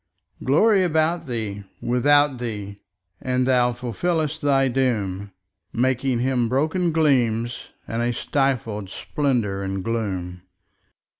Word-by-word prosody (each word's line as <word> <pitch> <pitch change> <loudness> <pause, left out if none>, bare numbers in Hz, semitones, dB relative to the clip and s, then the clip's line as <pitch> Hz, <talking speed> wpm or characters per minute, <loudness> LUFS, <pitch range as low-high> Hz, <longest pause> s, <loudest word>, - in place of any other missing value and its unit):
Glory 195 - +4
about 160 -1 +1
thee, 110 -5 -4 0.2
without 145 +2 +3
thee; 105 -4 -5 0.4
and 125 0 0
thou 125 -1 +3
fulfillest 155 - -2
thy 135 -2 +3
doom, 105 -7 -1 0.4
Making 130 +1 +1
Him 125 -2 +1
broken 160 +7 +1
gleams, 120 -7 +1 0.2
and 115 +1 -2
a 120 0 +1
stifled 120 -6 -1
splendour 115 -6 -1
and 95 -1 -3
gloom. 95 -6 -3
125 Hz, 105 wpm, -23 LUFS, 110-145 Hz, 0.4 s, Glory